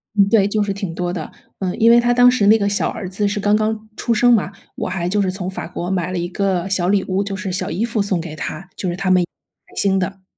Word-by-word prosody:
嗯， 200 -1 +4
对， 200 -3 +4
就 210 +1 0
是 205 -1 0
挺 195 -4 -5
多 175 0 -2
的， 170 -4 -5 0.3
嗯， 185 -2 -2
因 230 +1 +6
为 235 - +7
他 240 0 +2
当 245 0 +6
时 245 -5 +2
那 215 - +7
个 200 -1 0
小 205 - 0
儿 185 -3 -6
子 205 +2 -1
是 205 +1 -2
刚 205 +1 +3
刚 215 0 -1
出 235 - 0
生 245 +2 +4
嘛， 205 -3 +1 0.2
我 - - -3
还 180 -1 -2
就 210 - +1
是 185 -1 0
从 185 -1 -4
法 190 - -6
国 175 +1 -5
买 180 -2 -1
了 185 - -2
一 175 - -2
个 190 -1 -1
小 185 -2 0
礼 195 -1 +2
物， 190 +1 0
就 195 0 -4
是 190 -1 -4
小 185 - -3
衣 190 +7 -1
服 230 -1 -1
送 190 -4 0
给 160 -2 -7
他， 175 +4 -6
就 185 - -4
是 175 - -2
他 190 0 -2
们 180 -1 +4 0.5
新 195 -1 +2
的。 190 +1 -3
195 Hz, 300 characters per minute, -19 LUFS, 185-210 Hz, 0.5 s, 为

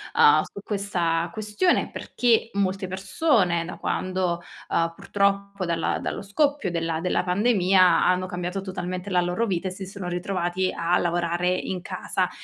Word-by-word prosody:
uhm, - - +6
su - - -10
questa 175 -5 -1
questione, 215 - +1
perché 230 -2 +1
molte 195 -1 -1
persone 190 - +1
da - - -7
quando 185 -2 -1 0.3
uhm, 165 0 +1
purtroppo 200 -1 0
dalla 165 -1 0
dallo - - -4
scoppio 275 - 0
della 165 -1 -1
della 180 0 +1
pandemia, 185 -2 +4
hanno 185 0 +2
cambiato 180 +2 -3
totalmente 185 0 -5
la 180 -1 +3
loro 175 +6 0
vita, 185 -2 -1
e - - -3
si 190 +1 -7
sono 190 -1 -7
ritrovati 180 0 -1
a 170 +1 +2
lavorare 175 0 0
in 185 0 -3
casa. - - -2
185 Hz, 150 wpm, -25 LUFS, 175-200 Hz, 0.3 s, uhm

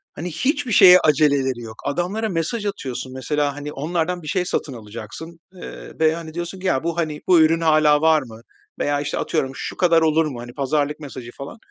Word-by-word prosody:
hani, 175 +3 -5
hiçbir 280 - -1
şeye 185 -2 +8
aceleleri 140 -5 +2
yok. 110 -1 -9
Adamlara 185 +9 -1
mesaj 190 +6 -2
atıyorsun, 130 -10 -5
mesela, 145 +2 -1
hani, 145 +1 -6
onlardan 170 +4 -2
bir 155 - -10
şey 180 +4 0
satın 145 -5 -2
alacaksın, 120 +9 -9
ııı, 180 - -10
veya, 160 +1 +3
hani, 160 -2 -8
diyorsun 175 +2 -5
ki, 190 - -3
"Ya, 135 -5 +1
bu, 170 0 -2
hani, 155 -3 -2
bu 180 -2 +6
ürün 165 +1 +3
hâlâ 155 -2 +4
var 160 -1 +4
mı?" 115 -4 -11 0.4
veya, 145 0 0
işte, 145 0 -3
atıyorum, 135 - -1
"Şu - - -6
kadar 170 -3 +4
olur 160 0 +3
mu?" 135 -6 -5
hani, 120 0 -10
pazarlık 145 +2 -1
mesajı 130 -5 -9
falan. 140 +10 -9
155 Hz, 200 wpm, -21 LUFS, 140-170 Hz, 0.4 s, şeye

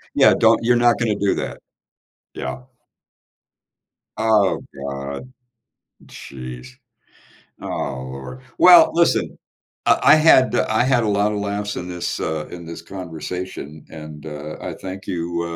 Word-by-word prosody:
Yeah, - - +6
don't - - +4
you're 120 +1 +3
not 120 0 +4
gonna 110 -3 +1
do 100 -1 +1
that. - - -5 0.8
Yeah. 65 0 -5 1.6
Oh 110 -4 +2 0.3
god. 70 - -6 0.8
Jeez. 65 -1 -9 0.9
Oh - - -6 0.4
lord 70 - -9 0.2
well, 175 -2 +8
listen. 170 0 +1 0.5
I - - +4
I 145 +3 +8
had 155 -5 +5
eh, - - +2
I 110 +3 +2
had 125 -3 +2
a - - 0
lotta 105 +1 +1
laughs 100 0 -3
in 90 - -5
this 90 -1 -4
uh, 80 -1 -3
in 85 -1 -9
this 85 0 -8
conversation, 85 -3 -7
and, 75 -1 -10
uh, 75 0 -7
I - - -5
thank 95 0 -8
you, 85 -1 -3
95 Hz, 135 wpm, -21 LUFS, 75-110 Hz, 1.6 s, well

